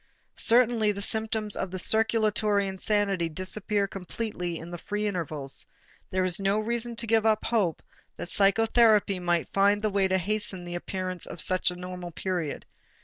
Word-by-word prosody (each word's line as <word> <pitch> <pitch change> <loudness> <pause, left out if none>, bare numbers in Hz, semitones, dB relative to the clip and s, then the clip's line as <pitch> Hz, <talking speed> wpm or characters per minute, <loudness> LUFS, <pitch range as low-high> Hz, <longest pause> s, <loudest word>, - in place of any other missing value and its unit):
Certainly 230 -3 +4
the 200 - -6
symptoms 220 -1 +1
of 190 - -3
the 185 - -5
circulatory 215 -1 +2
insanity 195 -2 0
disappear 200 +4 -1
completely 180 -2 -4
in 165 +2 -9
the 175 - -6
free 210 +4 -3
intervals; 155 -8 -4 0.5
there 185 0 0
is 185 +2 +1
no 195 +1 +2
reason 235 +2 -1
to 230 - -1
give 225 -1 +2
up 220 -1 +2
hope 205 -9 0 0.3
that - - -5
psychotherapy 210 0 +3
might 175 -2 -1
find 200 +1 +4
the 215 - +1
way 195 -1 +2
to 190 0 +2
hasten 190 -1 -2
the 175 - -6
appearance 185 0 -4
of - - -8
such 185 +4 +2
a 180 - -6
normal 180 0 -7
period. 170 -2 -3
195 Hz, 165 wpm, -27 LUFS, 180-215 Hz, 0.5 s, Certainly